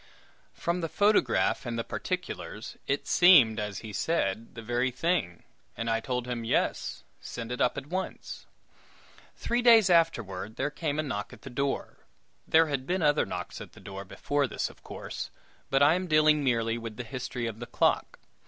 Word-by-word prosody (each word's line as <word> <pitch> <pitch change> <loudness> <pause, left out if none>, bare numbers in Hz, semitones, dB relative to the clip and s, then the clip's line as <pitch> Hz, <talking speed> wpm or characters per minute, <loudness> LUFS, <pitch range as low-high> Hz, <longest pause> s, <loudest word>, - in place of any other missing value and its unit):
From 175 +1 -1
the 165 - -2
photograph 205 +4 +2
and 120 -2 -4
the 115 - -1
particulars, 180 - -5
it 140 +1 0
seemed, 145 -12 +6
as 105 -2 -4
he 105 - -7
said, 115 -7 -1
the 115 - -7
very 120 +3 0
thing, 130 - -1 0.3
and 115 0 -1
I 115 - +2
told 125 +1 -3
him, 120 -2 -3
"Yes; 115 - -1 0.2
send 115 0 -7
it 125 - -3
up 125 - +2
at 135 - -4
once." 185 +5 -5 0.9
Three 240 +1 -1
days 225 -6 +7
afterward, 110 - +1
there 145 +3 -1
came 150 -1 -2
a 155 - +1
knock 105 -8 -4
at - - -14
the 135 - -8
door 140 +2 -2 0.5
there 160 +1 +6
had 140 -4 -3
been 180 -1 0
other 150 0 +3
knocks 90 -1 -6
at - - -10
the - - -14
door 100 0 -7
before 140 +8 -1
this, - - -3
of - - -22
course; - - -6 0.4
but 135 +1 +4
I 145 +3 +6
am 185 +1 -1
dealing 155 -1 +4
merely 115 -3 +1
with 115 -2 -7
the 125 - -4
history 125 0 -4
of 115 -1 -5
the 120 - -6
clock. - - +1
130 Hz, 185 wpm, -29 LUFS, 115-160 Hz, 0.9 s, days